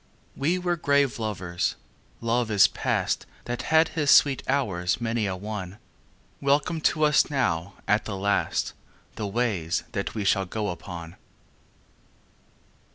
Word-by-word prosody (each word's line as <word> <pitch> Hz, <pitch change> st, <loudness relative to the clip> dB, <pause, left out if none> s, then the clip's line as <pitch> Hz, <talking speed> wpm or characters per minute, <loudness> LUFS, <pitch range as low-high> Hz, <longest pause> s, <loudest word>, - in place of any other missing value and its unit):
We 160 Hz, +6 st, +1 dB
were 175 Hz, -1 st, -1 dB
grave 140 Hz, -5 st, +2 dB
lovers. 95 Hz, -4 st, -2 dB, 0.5 s
Love 115 Hz, 0 st, 0 dB
is 105 Hz, -2 st, +6 dB
past -, -, -1 dB, 0.2 s
That 120 Hz, 0 st, -3 dB
had 160 Hz, 0 st, +5 dB
his 150 Hz, -3 st, -1 dB
sweet 140 Hz, -1 st, +6 dB
hours 95 Hz, -11 st, 0 dB
many 115 Hz, -2 st, -1 dB
a 95 Hz, -, -2 dB
one; 100 Hz, -1 st, -6 dB, 0.6 s
Welcome 145 Hz, +4 st, +1 dB
to 155 Hz, -, -2 dB
us 150 Hz, -1 st, +4 dB
now 100 Hz, -, -1 dB
at 105 Hz, +1 st, +2 dB
the 100 Hz, -3 st, -4 dB
last 100 Hz, +1 st, 0 dB, 0.4 s
The 105 Hz, -, -3 dB
ways 100 Hz, -6 st, -1 dB
that 100 Hz, -1 st, -3 dB
we 105 Hz, -, -2 dB
shall 95 Hz, 0 st, +2 dB
go 105 Hz, +2 st, -2 dB
upon. 85 Hz, -1 st, -7 dB
110 Hz, 135 wpm, -26 LUFS, 95-140 Hz, 0.6 s, is